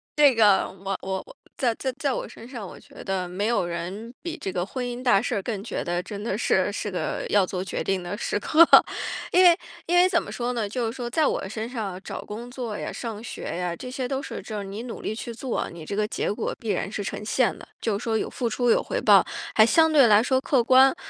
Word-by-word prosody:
这 290 -3 +6
个 210 -4 +4
我 195 0 -5
我 190 0 -3 0.3
在 245 -4 +2
在 265 - -1
在 280 -3 0
我 - - -4
身 230 - -12
上， 240 -5 -7
我 - - -10
觉 - - -13
得 190 -2 -2
没 190 +4 -2
有 235 -6 +1
人 180 +7 -5
比 340 -1 -5
这 190 - -4
个 175 -1 -1
婚 250 +5 -4
姻 245 0 -5
大 240 -6 +4
事 245 - -2
儿 200 - -1
更 205 -1 -4
觉 230 - -3
得 175 +1 -1
真 205 +1 -7
的 210 -3 -1
是， 195 -3 +2
是 205 +1 -3
个 180 - -3
要 205 -2 +4
做 185 0 -3
决 190 - -3
定 195 -1 0
的 175 +3 -4
时 205 - -1
刻。 315 +10 +6 0.7
因 365 - +6
为 345 -2 +7 0.3
因 350 +1 +3
为 360 +1 +7
怎 345 -2 +2
么 - - -8
说 245 0 -2
呢， 225 -4 -2
就 240 +2 -2
是 225 +2 -3
说 245 -2 -4
在 310 +5 +2
我 190 - -1
身 220 +2 -4
上 210 -7 -4
找 - - -6
工 230 +4 -7
作 240 -5 -4
呀、 - - -5
上 225 -3 -5
学 - - -7
呀， 180 -1 -2
这 250 - -8
些 255 0 -3
都 270 +1 -2
是 - - -6
就 215 - -6
是 - - -4
你 200 +3 -6
努 245 - -7
力 215 - -3
去 235 +1 -6
做， 245 +2 -3
你 170 -1 -9
这 200 - -4
个 210 0 +1
结 215 - -2
果 205 - -3
必 225 - -6
然 200 - -1
是 205 0 -4
呈 210 +1 -5
现 245 +3 +1
的， - - -13
就 215 -3 0
是 210 - -8
说 225 -1 +1
有 - - -2
付 245 - -2
出 245 +2 0
有 - - +4
回 - - -3
报， - - +6 0.3
还 215 - +8
相 320 +6 +4
对 280 -5 +6
来 210 -1 +6
说 260 +2 +2
客 265 -2 +2
观， 260 +3 +6
225 Hz, 280 characters per minute, -25 LUFS, 195-255 Hz, 0.7 s, 还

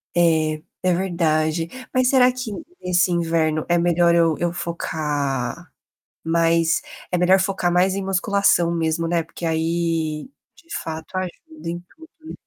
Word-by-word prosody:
É. 170 -1 +5 0.5
É, 185 -1 +2
verdade, 165 -3 0 0.3
mas 255 -1 +3
será 255 -1 +5
que 250 -2 -5 0.3
nesse 180 0 +2
inverno 165 -2 0
é 175 - +3
melhor 170 0 +3
eu 165 -2 +3
eu 175 - 0
focar 150 -4 -3 0.5
mais 165 0 +2 0.3
é 180 - +1
melhor 185 +2 +5
focar 190 -2 0
mais 180 +2 +3
em 195 - -2
musculação 195 -2 +2
mesmo, 165 0 0
né. 170 0 +1
Porque 170 - -8
aí, 165 0 -1 0.3
de 335 -1 -9
fato 160 +3 -6
ajuda 185 - -6
em 175 +1 -3 0.2
tudo, 320 +1 -15 0.2
né. - - -7
170 Hz, 145 wpm, -22 LUFS, 165-185 Hz, 0.5 s, É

